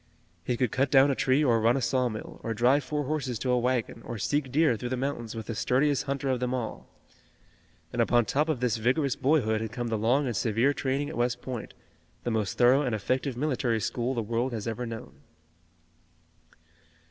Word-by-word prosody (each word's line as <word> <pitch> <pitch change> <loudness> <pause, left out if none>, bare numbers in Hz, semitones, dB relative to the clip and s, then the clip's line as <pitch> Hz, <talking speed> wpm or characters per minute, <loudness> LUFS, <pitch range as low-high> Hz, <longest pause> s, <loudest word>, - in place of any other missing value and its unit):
He 120 - -1
could 125 -4 +1
cut 135 +1 +1
down 135 +1 +6
a - - 0
tree 130 +4 +2
or 115 -4 +3
run 115 +4 +3
a - - 0
saw 125 +1 +1
mill, 110 -1 -8
or 115 0 -3
drive 130 +5 +3
four 145 +3 -2
horses 135 -4 -2
to 125 +3 -1
a 125 - +3
wagon, 120 -2 -1
or 120 - -6
seek 140 +4 -1
deer 150 -2 +3
through 120 +3 -5
the 130 - -2
mountains 125 -4 -3
with 110 -1 -5
the 115 - -4
sturdiest 130 +6 +1
hunter 140 0 -2
of 130 -2 +1
them 125 +1 -1
all. 120 -3 -5 1.1
And - - +1
upon 120 -1 +3
top 150 +8 0
of 140 -6 -1
this 120 -3 +1
vigorous 130 +4 +1
boyhood 125 -6 +2
had 110 -1 -4
come 120 -1 -3
the 110 -1 -1
long 125 +7 +2
and 120 -3 -2
severe 115 +7 +2
training 140 +1 -1
at - - -7
West 120 0 0
Point, 125 -4 -6 0.5
the 120 - -1
most 110 -4 -1
thorough 125 +3 +5
and 125 -6 0
effective 130 +4 -1
military 125 -5 0
school 120 +4 -2
the 115 - -1
world 120 +4 -1
has 110 -1 -4
ever 115 +2 -3
known. 115 -1 -8
125 Hz, 210 wpm, -28 LUFS, 115-135 Hz, 1.1 s, down